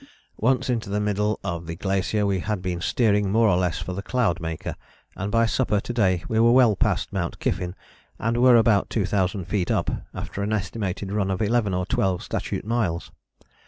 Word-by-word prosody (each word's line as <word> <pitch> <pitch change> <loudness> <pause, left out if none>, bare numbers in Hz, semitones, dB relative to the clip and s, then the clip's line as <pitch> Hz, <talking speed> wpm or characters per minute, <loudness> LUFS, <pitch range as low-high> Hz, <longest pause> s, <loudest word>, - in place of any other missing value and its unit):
"Once 130 +3 +2
into 115 -5 -1
the 105 +1 0
middle 105 0 0
of 85 -3 -4
the 85 - -4
glacier 100 +3 0
we 100 -2 +1
had 105 +2 -2
been 90 -1 -3
steering 105 -2 +2
more 115 +2 +4
or 100 - +4
less 90 -2 0
for 90 - -4
the 95 - -4
Cloudmaker 85 -10 -1 0.4
and 100 +2 -4
by 115 +1 +3
supper 115 -3 +1
to 120 - -5
day 95 -7 +2
were 115 +1 +4
well 120 -4 +5
past - - 0
Mount 85 -4 -2
Kyffin 90 +1 -2 0.4
and 115 +1 -1
were 125 0 +6
about 110 -3 +4
2000 95 -3 0
feet 95 -1 -1
up - - +1 0.2
after 100 - -6
an 105 +2 -1
estimated 100 -1 -3
run 100 -2 0
of 95 -1 -1
11 110 -3 +1
or 90 0 -1
12 95 -1 0
statute - - -3
miles. 110 -7 -1
100 Hz, 190 wpm, -24 LUFS, 90-115 Hz, 0.4 s, were